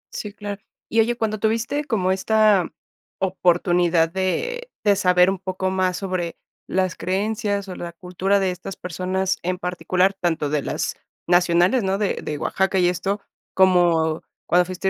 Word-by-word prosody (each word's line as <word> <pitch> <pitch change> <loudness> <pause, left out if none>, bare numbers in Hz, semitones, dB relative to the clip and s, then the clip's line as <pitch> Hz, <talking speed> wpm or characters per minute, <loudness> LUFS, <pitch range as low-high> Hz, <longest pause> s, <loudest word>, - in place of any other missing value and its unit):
Sí, 210 - -5
claro. 205 0 -7 0.3
Y 225 - +1
oye, 235 +2 +3
cuando 215 -2 -1
tuviste 230 +7 0
como 190 -8 0
esta 210 -1 +3 0.5
oportunidad 175 -2 +2
de 475 - -2
de 205 -1 +4
saber 180 -1 +4
un 195 - -2
poco 185 0 -2
más 185 -1 +1
sobre 185 -3 -3 0.3
las 185 -1 0
creencias 200 +1 -1
o 180 - -6
la 170 -1 -6
cultura 185 +3 0
de 190 -1 +1
estas 180 +1 -7
personas 185 +2 -2
en 180 +1 -2
particular, 180 +2 0
tanto 170 -6 -1
de 150 -1 0
las - - -3 0.3
nacionales, 175 +6 +3
¿no? 190 0 0
De 205 -2 -1
de 150 - -4
Oaxaca 190 +4 0
y 175 -1 +4
esto, 195 +3 -2 0.3
como 170 -4 +3 0.2
cuando 180 +1 +3
fuiste 185 +1 -2
185 Hz, 155 wpm, -22 LUFS, 180-200 Hz, 0.5 s, de